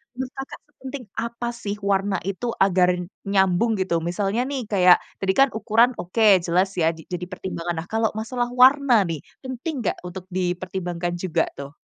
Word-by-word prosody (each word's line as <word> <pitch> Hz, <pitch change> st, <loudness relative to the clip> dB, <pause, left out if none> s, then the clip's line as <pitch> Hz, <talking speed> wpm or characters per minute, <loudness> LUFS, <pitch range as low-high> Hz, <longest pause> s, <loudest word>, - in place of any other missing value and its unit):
Menurut 260 Hz, +1 st, -4 dB
Kakak, 270 Hz, 0 st, -7 dB, 0.2 s
sepenting 265 Hz, -2 st, -7 dB
apa 235 Hz, +1 st, -4 dB
sih 210 Hz, -4 st, -4 dB
warna 195 Hz, -1 st, +1 dB
itu 200 Hz, +5 st, -3 dB, 0.2 s
agar 180 Hz, -1 st, +3 dB, 0.4 s
nyambung, 195 Hz, +3 st, +2 dB
gitu? 170 Hz, -3 st, 0 dB
Misalnya 200 Hz, +5 st, 0 dB
nih, 275 Hz, -3 st, -2 dB
kayak 180 Hz, -2 st, +6 dB, 0.2 s
tadi 190 Hz, 0 st, +1 dB
kan 275 Hz, 0 st, +6 dB
ukuran 225 Hz, +2 st, +3 dB
oke 180 Hz, +6 st, -3 dB, 0.2 s
jelas 180 Hz, +3 st, +2 dB
ya 160 Hz, -, +4 dB
di -, -, -10 dB
jadi 180 Hz, 0 st, -3 dB
pertimbangan, 175 Hz, -2 st, -4 dB
nah -, -, -25 dB
kalau 225 Hz, 0 st, +2 dB
masalah 240 Hz, +2 st, -2 dB
warna 275 Hz, 0 st, +6 dB, 0.2 s
nih, 160 Hz, -3 st, -3 dB, 0.3 s
penting 260 Hz, +6 st, -4 dB
nggak -, -, 0 dB
untuk 180 Hz, +1 st, -8 dB
dipertimbangkan 180 Hz, -1 st, -2 dB
juga 185 Hz, -4 st, +1 dB
tuh? 140 Hz, +2 st, -8 dB
195 Hz, 165 wpm, -23 LUFS, 180-240 Hz, 0.4 s, kayak